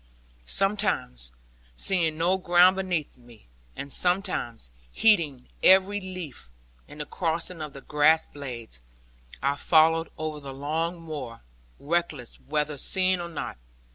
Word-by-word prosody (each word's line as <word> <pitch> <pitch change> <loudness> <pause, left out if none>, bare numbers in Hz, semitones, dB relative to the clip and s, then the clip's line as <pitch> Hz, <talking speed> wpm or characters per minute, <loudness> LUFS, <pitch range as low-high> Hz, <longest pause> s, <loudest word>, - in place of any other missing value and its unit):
Sometimes 195 - 0 0.4
seeing 165 - +1
no 175 +3 +2
ground 180 +1 +5
beneath 180 -8 -2
me, 120 -3 -18 0.3
and 140 0 -5
sometimes 180 - 0 0.2
heeding 160 - +2
every 190 +2 +6
leaf, 175 - -8 0.4
and 150 - -12
the - - -4
crossing 165 +1 -3
of 150 -2 -6
the 140 - -9
grass 155 +3 +3
blades, 120 - -8 0.6
I 140 +1 +2
followed 165 +1 +4
over 155 -1 -4
the 135 -2 -8
long 160 +5 -2
moor, 145 -8 -7 0.4
reckless 150 -5 -2
whether 150 0 -2
seen 185 +5 +2
or 170 - -5
not. 160 - -5
155 Hz, 125 wpm, -26 LUFS, 140-180 Hz, 0.6 s, every